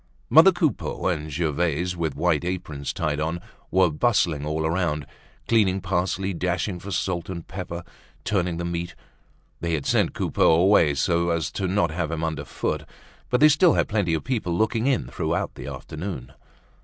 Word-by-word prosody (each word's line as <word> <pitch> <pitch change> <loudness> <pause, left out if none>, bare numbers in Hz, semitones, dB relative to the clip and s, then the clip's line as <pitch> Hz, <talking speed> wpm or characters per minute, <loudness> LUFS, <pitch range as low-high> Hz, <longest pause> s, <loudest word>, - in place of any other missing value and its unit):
Mother - - +8
Coupeau - - -1
and 80 -4 -1
Gervaise, 85 +2 0
with 80 -4 -2
white 85 -1 +1
aprons 85 -6 -3
tied 75 -3 -2
on, 80 +3 -1 0.3
were 95 -2 +3
bustling 80 -5 +1
all 80 +1 -1
around, 80 -3 0 0.4
cleaning 100 -5 +3
parsley, 95 +1 -1
dashing 90 +2 -2
for 100 - -8
salt 90 -1 -2
and 85 -3 -6
pepper, 90 -2 -6 0.4
turning 90 -4 0
the 85 - -3
meat. 85 0 -4 0.6
They 85 -1 -2
had 75 - -4
sent - - +1
Coupeau - - +3
away 85 -4 +4
so 85 +4 +1
as 85 -3 -1
not 95 -1 +1
to - - -7
have 85 -2 -2
him 80 -1 -3
underfoot, 80 -4 -3 0.5
but 125 +1 +1
they 155 - +9
still 160 +3 +5
had - - +2
plenty 100 -7 +1
of 80 - -3
people 110 -10 -1
looking 110 +3 +1
in 135 -3 +1
throughout 85 0 -2
the - - -9
afternoon. 75 -6 -6
85 Hz, 165 wpm, -24 LUFS, 80-95 Hz, 0.6 s, they